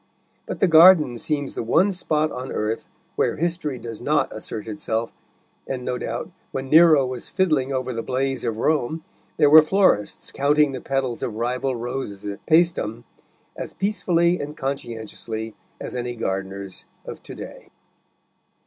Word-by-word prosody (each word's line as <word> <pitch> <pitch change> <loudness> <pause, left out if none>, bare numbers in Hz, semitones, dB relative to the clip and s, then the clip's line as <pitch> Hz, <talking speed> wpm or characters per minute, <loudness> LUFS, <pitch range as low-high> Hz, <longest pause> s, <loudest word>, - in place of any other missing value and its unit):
But - - -4
the 195 - +4
garden 160 -7 +7
seems 145 0 -2
the - - -3
one 170 - +3
spot 155 -4 0
on 130 +1 -6
earth 110 +1 -2 0.3
where - - +1
history 165 -4 -2
does 115 -2 -8
not 150 +4 0
assert 110 0 -6
itself, 110 +2 -3 0.5
and, 130 -2 -4
no 125 0 -2
doubt, - - -4 0.2
when 135 0 -4
Nero 155 -3 +7
was 125 -1 -6
fiddling 155 -8 +1
over 130 -1 -2
the 115 - -3
blaze 130 +2 -2
of 115 -3 -2
Rome, 155 +4 0 0.3
there 150 - +5
were 160 +1 +11
florists 155 - +1
counting 145 +1 +3
the 130 -2 -6
petals 135 -3 -2
of 110 - -3
rival 125 +3 -1
roses 120 -4 -5
at 100 0 -6
Paestum 160 -9 +2 0.5
as - - -7
peacefully 180 -3 +1
and 150 +1 -6
conscientiously 115 -4 -5 0.3
as - - -6
any 120 0 -3
gardeners 95 -3 -4 0.2
of - - -8
to - - -10
day. - - -10
130 Hz, 155 wpm, -23 LUFS, 115-155 Hz, 0.5 s, were